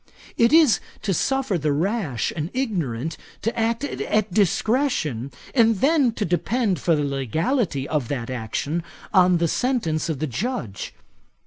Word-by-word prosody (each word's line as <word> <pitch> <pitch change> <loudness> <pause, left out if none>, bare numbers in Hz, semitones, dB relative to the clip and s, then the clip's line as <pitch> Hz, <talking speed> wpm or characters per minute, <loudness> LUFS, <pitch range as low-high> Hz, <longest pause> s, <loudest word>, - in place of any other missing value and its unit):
It 235 +1 +4
is 315 -7 +6 0.2
to 200 -3 +1
suffer 260 - 0
the 150 0 0
rash 160 - -1
and 155 0 -3
ignorant 165 - -2 0.3
to 230 - -1
act 230 +3 0
at 215 -8 -1
discretion, 200 - +1 0.2
and 230 -3 +4
then 280 -3 +3
to 210 - -2
depend 195 - 0
for 165 +4 +2
the 150 - 0
legality 140 - -1
of 145 -6 -1
that 125 -2 -3
action 130 +7 -2 0.3
on 180 -2 +5
the 170 0 +1
sentence 170 - 0
of 160 - -1
the 155 - -1
Judge. 130 - -4
180 Hz, 145 wpm, -23 LUFS, 145-235 Hz, 0.3 s, is